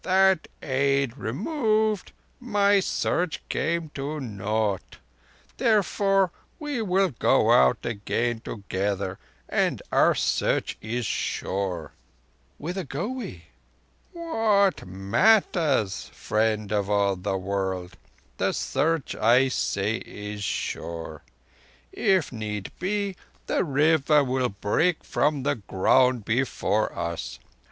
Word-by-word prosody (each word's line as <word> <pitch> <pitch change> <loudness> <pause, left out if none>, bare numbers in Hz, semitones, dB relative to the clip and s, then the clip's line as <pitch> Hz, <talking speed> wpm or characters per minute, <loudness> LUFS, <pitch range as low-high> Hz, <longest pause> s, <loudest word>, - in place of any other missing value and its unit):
That 190 -2 +3 0.2
aid 135 -2 +1
removed, 215 - 0 0.3
my 205 -5 +3
Search 180 -3 -1
came 170 -1 -1
to 145 +2 -4
naught. 105 -4 -2 0.6
Therefore 200 -5 +2 0.3
we 295 -6 -3
will 190 -2 +2
go 125 - +3
out 65 0 +4
again 120 +1 -1
together, 100 -3 -3 0.3
and - - +1
our - - +4
Search - - 0 0.2
sure." 95 -4 -2 0.7
"Whither 180 +5 -4
go 150 - -4
we?" 235 - -6 0.7
"What 225 - +1
matters, 130 - +2
Friend 110 -1 0
of 100 -2 0
all 100 -1 +2
the 95 +1 -2
World? 95 -1 -3 0.4
The - - +1
Search, 160 -2 0
I 125 +4 +4
say, 105 -3 0
is 105 0 -7
sure. 80 -5 -4 0.7
If 190 -4 +1
need 105 -4 -5
be, 200 0 -1 0.3
the - - +1
River 150 -1 +3
will 130 -1 0
break 105 - 0
from 145 -2 0
the 140 - 0
ground 120 +4 +2
before 110 -3 0
us. 85 0 -4
130 Hz, 100 wpm, -26 LUFS, -, 0.7 s, out